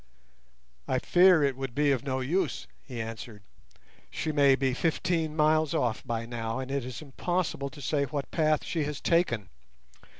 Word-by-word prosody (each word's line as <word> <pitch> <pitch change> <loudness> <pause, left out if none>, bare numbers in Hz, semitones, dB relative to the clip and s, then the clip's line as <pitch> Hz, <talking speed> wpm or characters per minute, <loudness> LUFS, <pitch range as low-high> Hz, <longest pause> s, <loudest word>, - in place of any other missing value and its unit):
"I 130 - +1
fear 175 +3 +5
it 140 -2 +1
would 135 -2 -5
be 145 0 +3
of 130 -4 0
no 130 -1 -2
use," 170 +9 -1 0.2
he 125 -4 -8
answered. 110 -2 -7 0.7
"She 155 - -3
may 140 -2 +5
be 130 -1 0
fifteen 160 +1 0
miles 155 -1 +3
off 120 -3 0
by 115 -2 -3
now, 115 -1 -4
and 130 0 -5
it 140 -2 -1
is 125 +2 -7
impossible 155 0 -2
to 140 +2 -12
say 140 +1 +1
what 140 0 -4
path 155 -2 +2
she 160 -3 -1
has 150 -1 -4
taken. 120 - +1
140 Hz, 170 wpm, -28 LUFS, 125-155 Hz, 0.7 s, fear